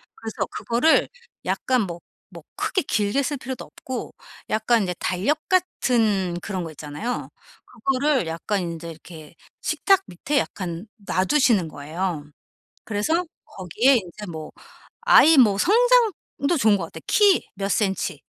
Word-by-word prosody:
그래서 225 Hz, -1 st, -4 dB
그거를 245 Hz, +8 st, +2 dB, 0.4 s
약간 255 Hz, -3 st, +1 dB
뭐 175 Hz, -3 st, -6 dB, 0.3 s
뭐 -, -, -11 dB
크게 380 Hz, -, 0 dB
길게 210 Hz, +6 st, 0 dB
쓸 290 Hz, +2 st, -2 dB
필요도 260 Hz, -1 st, -6 dB
없고 260 Hz, -1 st, -7 dB, 0.4 s
약간 220 Hz, +1 st, +2 dB
이제 180 Hz, -2 st, -2 dB
달력 200 Hz, +13 st, 0 dB
같은 225 Hz, -, +1 dB
그런 190 Hz, -4 st, -4 dB
거 165 Hz, -, -7 dB
있잖아요. 155 Hz, -, -5 dB, 0.4 s
그거를 265 Hz, -, 0 dB
약간 170 Hz, +5 st, -2 dB
인제 170 Hz, -1 st, -5 dB
이렇게 160 Hz, -1 st, -13 dB, 0.3 s
식탁 390 Hz, -1 st, +2 dB
밑에 275 Hz, +11 st, -1 dB
약간 175 Hz, 0 st, -5 dB, 0.2 s
놔두시는 200 Hz, -, +2 dB
거예요. 155 Hz, +2 st, -4 dB, 0.6 s
그래서 225 Hz, -, 0 dB, 0.2 s
거기에 215 Hz, -, +2 dB
인제 210 Hz, 0 st, -7 dB
뭐 155 Hz, -1 st, -7 dB, 0.5 s
아이 320 Hz, 0 st, +7 dB
뭐 215 Hz, -7 st, +6 dB, 0.4 s
성장도 345 Hz, -, -2 dB
좋은 215 Hz, -6 st, +4 dB
것 -, -, -4 dB
같아. -, -, -11 dB
키 405 Hz, -3 st, +4 dB
몇 195 Hz, 0 st, -3 dB
센티 195 Hz, -2 st, -1 dB
210 Hz, 270 characters per minute, -23 LUFS, 175-265 Hz, 0.6 s, 아이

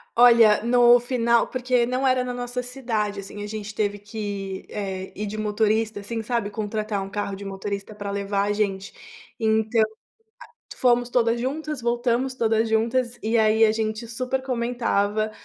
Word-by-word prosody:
Olha, 235 Hz, -3 st, +6 dB
no 240 Hz, 0 st, +6 dB
final 235 Hz, -1 st, +2 dB
porque 250 Hz, -1 st, +1 dB
não 255 Hz, +2 st, -1 dB
era 255 Hz, -1 st, +3 dB
na 250 Hz, 0 st, -4 dB
nossa 245 Hz, 0 st, -4 dB
cidade, 230 Hz, -5 st, -3 dB
assim, 200 Hz, +1 st, -8 dB
a -, -, -5 dB
gente 215 Hz, 0 st, -6 dB
teve 205 Hz, -1 st, -1 dB
que, 205 Hz, -2 st, -5 dB
eh, 190 Hz, -2 st, -5 dB
ir 210 Hz, -, -3 dB
de 210 Hz, +2 st, -5 dB
motorista, 215 Hz, 0 st, 0 dB
assim, 225 Hz, +3 st, -4 dB
sabe, 230 Hz, -2 st, -1 dB
contratar 210 Hz, -1 st, -3 dB
um 195 Hz, -, -7 dB
carro 205 Hz, -1 st, -3 dB
de 200 Hz, +1 st, -9 dB
motorista 200 Hz, +1 st, -5 dB
para 205 Hz, -1 st, -5 dB
levar 200 Hz, 0 st, -1 dB
a 205 Hz, +1 st, 0 dB
gente. 200 Hz, -2 st, -2 dB, 0.5 s
Então, 220 Hz, +1 st, +2 dB, 0.7 s
a 470 Hz, -, -16 dB
fomos 245 Hz, -1 st, +3 dB
todas 235 Hz, -1 st, +2 dB
juntas, 300 Hz, +2 st, -3 dB
voltamos 240 Hz, +2 st, 0 dB
todas 225 Hz, -2 st, +1 dB
juntas 235 Hz, +2 st, +1 dB
e, 225 Hz, +2 st, +1 dB
aí, 220 Hz, 0 st, +5 dB
a 215 Hz, -, +3 dB
gente 220 Hz, +1 st, -3 dB
super 255 Hz, +3 st, -2 dB
comentava 230 Hz, -4 st, 0 dB
220 Hz, 165 wpm, -24 LUFS, 205-245 Hz, 0.7 s, Olha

